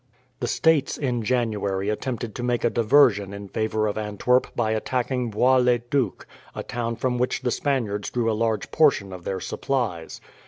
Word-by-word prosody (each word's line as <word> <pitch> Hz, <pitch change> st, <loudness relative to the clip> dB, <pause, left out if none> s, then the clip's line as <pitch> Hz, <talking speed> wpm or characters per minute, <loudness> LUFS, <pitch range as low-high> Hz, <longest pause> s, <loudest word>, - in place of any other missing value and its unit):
The -, -, -2 dB
States 160 Hz, -4 st, +2 dB
in 125 Hz, -4 st, -1 dB
January 105 Hz, -5 st, -1 dB
attempted 120 Hz, 0 st, -3 dB
to -, -, -6 dB
make 120 Hz, -1 st, 0 dB
a 120 Hz, -, +2 dB
diversion 115 Hz, -5 st, +3 dB
in 100 Hz, -1 st, -8 dB
favour 110 Hz, 0 st, -1 dB
of 105 Hz, 0 st, -1 dB
Antwerp 110 Hz, +4 st, +1 dB
by 110 Hz, -2 st, 0 dB
attacking 125 Hz, +2 st, -1 dB
Bois 125 Hz, +5 st, +3 dB
le 125 Hz, -1 st, +4 dB
Duc, 120 Hz, -2 st, -2 dB, 0.3 s
a -, -, -4 dB
town 115 Hz, -1 st, -3 dB
from 125 Hz, +1 st, -1 dB
which 125 Hz, +1 st, -1 dB
the 125 Hz, -, 0 dB
Spaniards 115 Hz, -9 st, -1 dB
drew 120 Hz, -2 st, -1 dB
a 115 Hz, -, +2 dB
large 110 Hz, -1 st, -1 dB
portion 105 Hz, -11 st, +3 dB
of 90 Hz, -2 st, -10 dB
their 95 Hz, -1 st, -2 dB
supplies. 95 Hz, -3 st, -3 dB
115 Hz, 180 wpm, -24 LUFS, 105-125 Hz, 0.3 s, le